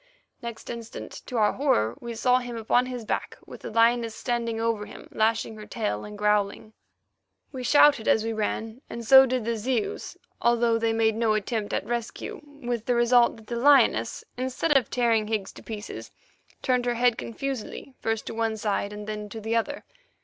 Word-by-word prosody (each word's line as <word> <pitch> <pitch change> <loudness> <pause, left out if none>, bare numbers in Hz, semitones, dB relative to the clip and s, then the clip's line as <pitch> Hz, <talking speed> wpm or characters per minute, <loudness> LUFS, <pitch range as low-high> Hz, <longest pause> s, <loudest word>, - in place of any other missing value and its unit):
Next 235 -2 -7
instant, 230 -1 -8
to 250 - -3
our 210 -2 +3
horror, 120 - +1
we 235 -1 -6
saw 250 +2 +3
him 245 -2 -6
upon 245 +3 +2
his 250 -3 -5
back, - - -3
with - - -11
the - - -6
lioness 230 0 +3
standing 235 -2 -2
over 225 -2 -1
him, - - -11
lashing 225 +1 +1
her 215 - -10
tail, 220 -3 -2
and 210 0 -9
growling. 210 +1 0 0.8
We 260 -3 -6
shouted 285 -3 +5
as 220 - +4
we 225 0 -2
ran, 220 +2 -3
and 235 0 -6
so 265 +3 +9
did 250 -3 -1
the 230 0 0
Zeus, 230 +1 -2 0.2
although 235 -1 +3
they 225 0 +1
made 225 -1 +2
no 225 -1 +2
attempt 215 0 -2
at - - -1
rescue, 235 +5 -4 0.2
with 240 -2 -3
the 245 - +2
result 240 0 +4
that 220 - -15
the 235 +2 -4
lioness, 240 - +4
instead 260 +5 0
of 260 -5 +3
tearing 230 -3 +2
Higgs 215 -3 -2
to - - -13
pieces, 215 -1 -7 0.5
turned 250 -1 +1
her 240 - +1
head 245 0 +3
confusedly 265 +2 -5
first 225 -1 -2
to - - -5
one 225 -1 -1
side 205 -1 -1
and 210 0 -7
then 210 -1 -5
to 225 - -7
the 225 +2 -2
other. 230 - -1
230 Hz, 190 wpm, -26 LUFS, 220-245 Hz, 0.8 s, so